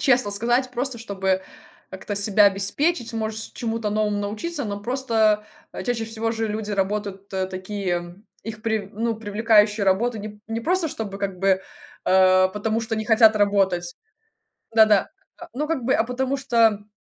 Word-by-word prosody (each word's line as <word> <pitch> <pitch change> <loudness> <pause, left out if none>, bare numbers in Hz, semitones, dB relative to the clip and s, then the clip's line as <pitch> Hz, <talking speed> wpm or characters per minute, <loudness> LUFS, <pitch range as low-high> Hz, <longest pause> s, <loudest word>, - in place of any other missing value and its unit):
честно 250 -5 +3
сказать, 240 +5 +1
просто 255 +1 -3
чтобы 190 -4 -1 0.5
как-то 195 +2 -6
себя 205 +1 +4
обеспечить, 230 - +1
может, 220 -1 -4
чему-то 225 -2 -2
новому 210 -1 0
научиться. 220 +10 -3
Но 205 -1 -4
просто, 225 -4 +1 0.3
э, - - -6
чаще 240 -2 -1
всего 225 0 -2
же 225 -1 -2
люди 210 0 -4
работают 200 0 -2
тэ 190 -1 -2
такие, 185 0 -4
м, 175 +4 -9 0.2
их 215 -1 -8
прив 220 -3 -2
ну, 225 +2 -1
привлекающую 210 -1 +2
работу 215 +5 +1
не 210 +1 -6
п 210 - -16
не 225 0 -3
просто, 345 +5 +1
чтобы, 205 -7 -5
как 195 -2 -3
бы, 190 0 +2 0.5
э, 185 0 +5
потому 215 +3 -2
что 225 0 -3
не 220 - -2
хотят 220 -1 +5
работать 195 -4 +1 0.8
Да-да, 215 -3 +5 0.3
а, 345 - -10
ну, 300 +4 -2
как 320 -6 -2
бы, 255 +3 +2
а - - +3
потому 260 +3 -2
что, 260 -3 -3
м, 210 -1 -5
215 Hz, 175 wpm, -23 LUFS, 200-230 Hz, 0.8 s, э